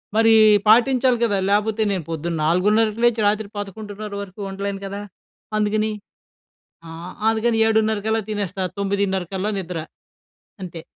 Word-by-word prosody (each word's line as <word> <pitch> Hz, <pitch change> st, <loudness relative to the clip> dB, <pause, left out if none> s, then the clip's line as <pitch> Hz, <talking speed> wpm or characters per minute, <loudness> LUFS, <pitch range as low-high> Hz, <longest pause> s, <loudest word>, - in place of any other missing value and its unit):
మరి 225 Hz, 0 st, +5 dB, 0.3 s
పాటించాలి 250 Hz, +2 st, +4 dB
కదా! 205 Hz, -3 st, 0 dB
లేకపోతే 210 Hz, +2 st, +1 dB
నేను 185 Hz, -4 st, -2 dB
పొద్దున్న 165 Hz, +1 st, -3 dB
4:30 210 Hz, +6 st, +2 dB
లేచి 235 Hz, -2 st, +2 dB
రాత్రి 210 Hz, 0 st, 0 dB
11:30 205 Hz, +1 st, -7 dB
వరకు 195 Hz, +1 st, -11 dB
ఉండలేను 195 Hz, 0 st, -4 dB
కదా! 200 Hz, +1 st, -5 dB, 0.6 s
అందుకని 215 Hz, +1 st, 0 dB, 1.0 s
ఆ! -, -, -9 dB, 0.4 s
అందుకని 225 Hz, 0 st, +1 dB
7:30 220 Hz, -1 st, +2 dB
కల్లా 220 Hz, 0 st, +1 dB
తినేస్తా 200 Hz, -2 st, -2 dB
9:30 200 Hz, -1 st, 0 dB
కల్లా 190 Hz, +3 st, -1 dB
నిద్ర 180 Hz, -2 st, -5 dB, 0.9 s
అంతే. 170 Hz, -2 st, -7 dB
205 Hz, 125 wpm, -21 LUFS, 195-220 Hz, 1.0 s, మరి